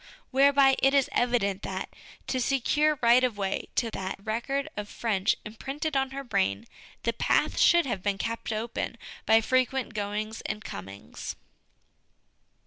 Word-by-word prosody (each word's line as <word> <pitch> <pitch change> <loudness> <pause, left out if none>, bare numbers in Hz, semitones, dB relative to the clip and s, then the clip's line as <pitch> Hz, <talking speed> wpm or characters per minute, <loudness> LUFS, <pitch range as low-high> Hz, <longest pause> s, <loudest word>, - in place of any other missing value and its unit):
Whereby 275 0 +5
it 270 +1 +4
is 275 -2 +3
evident 210 -6 +1
that, 190 0 -4 0.4
to 260 - -1
secure 295 +4 +2
right 240 +2 +6
of 245 -5 0
way 195 -1 -2
to 230 -2 0
that 190 -2 -4
record 240 +6 -2
of 210 0 -5
French 205 -5 0
imprinted 275 +8 -4
on 270 0 +1
her 275 +1 -6
brain, 100 - 0 0.4
the - - +1
path - - +1
should 345 -2 +5
have 205 -8 -2
been 200 0 0
kept 230 +2 -3
open 225 +1 -3 0.3
by 225 +1 +6
frequent 255 +2 0
goings 210 +1 -3
and 215 0 -4
comings. 95 +1 -7
235 Hz, 145 wpm, -28 LUFS, 205-270 Hz, 0.4 s, right